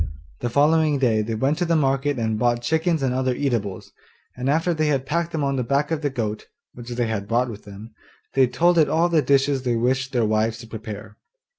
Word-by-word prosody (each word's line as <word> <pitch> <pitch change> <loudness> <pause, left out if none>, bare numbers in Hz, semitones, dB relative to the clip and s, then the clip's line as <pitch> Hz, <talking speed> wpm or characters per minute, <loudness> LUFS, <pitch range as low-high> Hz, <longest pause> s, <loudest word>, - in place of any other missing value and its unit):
The 120 - -2
following 150 +3 +3
day 115 -5 +2
they 110 +1 -3
went 135 +8 0
to 175 - +1
the 170 0 +1
market 135 -1 +1
and 110 -2 -1
bought 120 0 +1
chickens 160 +2 +1
and 130 -2 +1
other 130 -1 0
eatables, 115 -9 -2 0.4
and 125 +2 -2
after 165 +4 +2
they 155 -1 0
had 135 -3 0
packed 170 +3 -1
them 155 -3 -2
on 140 -1 0
the 125 - 0
back 140 +5 0
of 160 -2 -1
the 145 - 0
goat 110 -5 -4 0.3
(which 120 0 -10
they 120 0 -1
had 105 -3 -3
brought 120 +2 +1
with 105 -1 -11
them), 105 +2 -11 0.4
they 135 -1 +4
told 170 +6 +3
it 155 - +4
all 165 +2 +2
the 165 -3 +3
dishes 140 0 +2
they 125 -2 0
wished 130 +3 0
their 120 -3 +1
wives 110 +1 +1
to 115 - -10
prepare. 110 -1 -8
130 Hz, 230 wpm, -23 LUFS, 115-150 Hz, 0.4 s, they